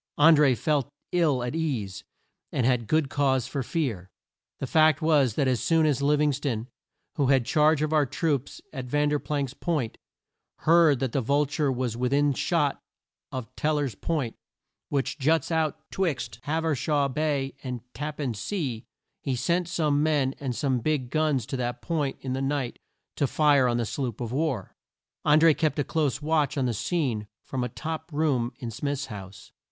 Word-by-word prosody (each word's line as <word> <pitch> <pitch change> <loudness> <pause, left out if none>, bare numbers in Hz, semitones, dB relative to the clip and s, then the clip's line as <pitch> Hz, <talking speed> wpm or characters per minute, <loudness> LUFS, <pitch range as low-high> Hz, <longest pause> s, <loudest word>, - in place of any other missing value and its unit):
An 160 +2 +7
dré 140 -5 +4
felt 145 0 0 0.2
ill 155 -8 +2
at 125 - -3
ease, 130 -13 -2 0.5
and 125 - 0
had 125 -3 +1
good 155 -2 +2
cause 130 -2 +1
for 140 - -3
fear. 120 - -2 0.5
The - - -3
fact 155 +1 +4
was 150 -8 +3
that 140 - +2
as 125 -3 +1
soon 165 -1 +3
as 145 -3 +1
Liv 145 +1 +3
ing 150 -1 +3
ston, 125 -5 -2 0.5
who 140 -3 +2
had 135 -3 +3
charge 155 0 +3
of 155 +1 -1
our 150 -3 +3
troops 145 -1 -2
at 130 -3 -5
Ver 145 +4 +1
planck's 140 -4 -2
Point, 150 -10 -2 0.6
heard 160 -5 +5
that 130 -3 0
the 135 - 0
Vul 140 +5 +2
ture 145 0 0
was 125 -3 -2
with 125 +2 0
in 145 0 +3
shot 125 - 0 0.5
of 130 -3 -6
Tel 155 0 +1
ler's 140 -5 -1
Point, 135 +1 -2 0.6
which 140 +1 -1
juts 160 +3 +2
out 160 -1 +1
'twixt 130 - -2
Hav 160 +2 -1
er 160 -2 +2
straw 145 +1 +1
Bay 140 -1 -1
and 125 -3 -4
Tap 150 +1 -5
pan 135 -5 -2
Sea, 125 - -3 0.4
he 135 -3 -1
sent 170 +7 0
some 150 -4 +1
men 145 -4 +2
and 130 -4 -3
some 130 -2 0
big 130 -1 -1
guns 155 -6 +1
to 135 +2 -4
that 120 -1 -2
point 150 -5 -1
in 130 -1 -3
the 135 - -2
night 135 -2 -2 0.4
to 140 - +2
fire 145 -2 +4
on 120 -1 +1
the 120 - 0
sloop 120 -1 -3
of 120 -2 -4
war. 135 - -1 0.5
An 150 +1 +6
dré 160 -1 +6
kept 155 -1 0
a 145 - +2
close 150 -1 -1
watch 150 -1 +1
on 135 - +1
the 120 - 0
scene 120 - -1 0.2
from 130 -2 -3
a 125 - -2
top 160 +6 -5
room 145 -6 +1
in 120 -2 -5
Smith's 140 +4 -2
house. 95 -4 -10
140 Hz, 190 wpm, -27 LUFS, 125-155 Hz, 0.6 s, An